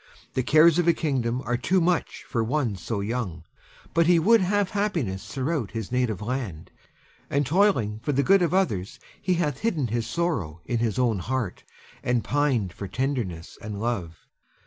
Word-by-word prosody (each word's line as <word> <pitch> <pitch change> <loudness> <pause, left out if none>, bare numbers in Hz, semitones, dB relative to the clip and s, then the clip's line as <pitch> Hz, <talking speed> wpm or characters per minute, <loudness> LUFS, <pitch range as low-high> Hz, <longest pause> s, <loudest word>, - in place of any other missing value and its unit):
The 130 - +1
cares 155 +5 +5
of 175 - +1
a 170 - +6
kingdom 130 -6 -1
are 120 0 0
too 180 +10 +2
much 175 -1 0
for 115 - -1
one 125 -3 0
so 100 +3 -3
young; 100 -7 -3 0.5
but 165 0 +3
he 175 -1 +6
would 220 +7 +5
have 200 +1 +1
happiness 170 - -1
throughout 135 -3 -2
his 115 -3 -5
native 125 -5 0
land, 115 -9 -4 0.6
and 140 +1 +1
toiling 135 - +2
for 135 - -2
the 140 0 +2
good 195 +3 +5
of 170 -3 +2
others 115 - 0 0.2
he 185 - +1
hath 150 -6 -1
hidden 160 - 0
his 115 0 -1
sorrow 120 - -2
in 120 - -1
his 115 -3 0
own 120 -6 +2
heart, 120 -1 -3 0.4
and 125 -2 0
pined 130 -10 +1
for 100 - -6
tenderness 115 -8 -3
and 105 -2 -5
love. 100 -8 -3
125 Hz, 175 wpm, -26 LUFS, 110-165 Hz, 0.6 s, a